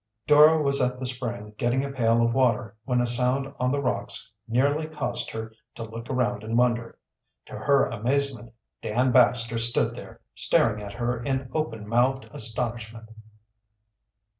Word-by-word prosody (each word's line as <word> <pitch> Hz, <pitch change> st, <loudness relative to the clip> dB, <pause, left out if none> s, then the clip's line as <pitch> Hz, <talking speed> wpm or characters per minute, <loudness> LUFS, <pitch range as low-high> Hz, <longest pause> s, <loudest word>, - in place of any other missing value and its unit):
Dora 150 Hz, +2 st, +6 dB
was 140 Hz, -2 st, +1 dB
at 125 Hz, 0 st, 0 dB
the 130 Hz, -, -4 dB
spring 120 Hz, -4 st, -5 dB
getting 125 Hz, +3 st, +1 dB
a 140 Hz, -, -5 dB
pail 115 Hz, -3 st, +2 dB
of 115 Hz, -, 0 dB
water 115 Hz, -4 st, +1 dB
when 125 Hz, -2 st, +1 dB
a -, -, +1 dB
sound 125 Hz, +3 st, 0 dB
on 125 Hz, 0 st, +1 dB
the 145 Hz, -, 0 dB
rocks 110 Hz, 0 st, -2 dB, 0.2 s
nearby 140 Hz, +7 st, +1 dB
caused 155 Hz, -3 st, -3 dB
her 110 Hz, 0 st, -7 dB, 0.2 s
to 115 Hz, -, -6 dB
look 115 Hz, +2 st, -9 dB
around 125 Hz, -2 st, -1 dB
in 115 Hz, +2 st, -2 dB
wonder. 120 Hz, -1 st, 0 dB, 0.5 s
To -, -, -17 dB
her 140 Hz, -1 st, +2 dB
amazement 125 Hz, +1 st, 0 dB, 0.3 s
Dan 125 Hz, +4 st, +1 dB
Baxter 115 Hz, -2 st, +3 dB
stood 115 Hz, +1 st, +1 dB
there, -, -, -11 dB
staring 105 Hz, -2 st, +2 dB
at 100 Hz, -1 st, -8 dB
her 120 Hz, +1 st, -2 dB
in 130 Hz, 0 st, -3 dB
open 115 Hz, -9 st, -3 dB
mouthed 125 Hz, +4 st, +1 dB
astonishment. 115 Hz, 0 st, -1 dB
120 Hz, 160 wpm, -25 LUFS, 115-135 Hz, 0.5 s, Dora